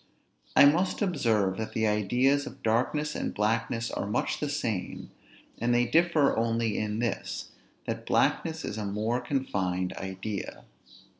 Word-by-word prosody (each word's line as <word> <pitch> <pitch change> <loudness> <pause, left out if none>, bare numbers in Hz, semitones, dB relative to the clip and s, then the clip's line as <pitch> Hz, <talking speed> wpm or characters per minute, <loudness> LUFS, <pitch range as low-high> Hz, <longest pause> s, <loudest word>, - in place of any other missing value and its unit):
I - - +9
must 175 +8 +3
observe, 115 - +1
that 110 - -4
the 110 - +1
ideas 125 +7 +2
of 135 - -11
darkness 130 +7 +1
and - - -3
blackness 115 +2 0
are - - -3
much 105 - -1
the 150 - -2
same; 115 -10 -3 0.5
and 120 +1 +2
they 120 0 +3
differ 160 +2 +3
only 115 -1 0
in 105 0 -2
this, 120 0 -3 0.3
that - - -4
blackness - - +1
is 110 - -4
a 105 - -3
more 110 +5 -1
confined 95 -9 -1
idea. 95 +1 -5
115 Hz, 145 wpm, -28 LUFS, 105-135 Hz, 0.5 s, I